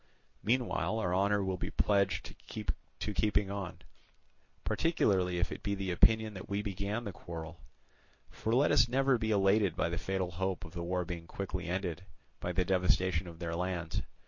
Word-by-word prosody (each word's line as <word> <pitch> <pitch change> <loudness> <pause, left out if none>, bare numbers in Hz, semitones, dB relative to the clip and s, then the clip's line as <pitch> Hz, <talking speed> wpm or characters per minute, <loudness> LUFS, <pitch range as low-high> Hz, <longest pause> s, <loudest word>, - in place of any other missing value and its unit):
Meanwhile 115 -1 +1
our 90 -5 0
honour 100 +2 +3
will 95 -1 -1
be - - -2
pledged 100 -2 +1 0.2
to 105 - -4
keeping 105 0 +1
on, 95 -3 -5 0.8
particularly 95 - +2
if 85 - 0
it - - -6
be 100 -1 -1
the 95 -2 -2
opinion 110 +4 +4
that 95 +1 -8
we 100 +1 -1
began 100 +3 -2
the 100 - -4
quarrel. 85 -1 -7 0.7
For 110 +1 -1
let 140 +4 +4
us 115 - +6
never 135 0 +3
be 110 -1 -1
elated 100 -3 +3
by 85 - +1
the 85 0 -2
fatal 95 -1 -1
hope 95 +1 -2
of 85 - -12
the 85 - -4
war 90 +1 -1
being 85 -1 -6
quickly 95 -1 -4
ended 90 -1 -2 0.4
by 90 - -2
the 90 0 +1
devastation 90 -1 +2
of 85 -1 -9
their 85 -1 -3
lands. 85 -2 -2
95 Hz, 175 wpm, -32 LUFS, 90-105 Hz, 0.8 s, us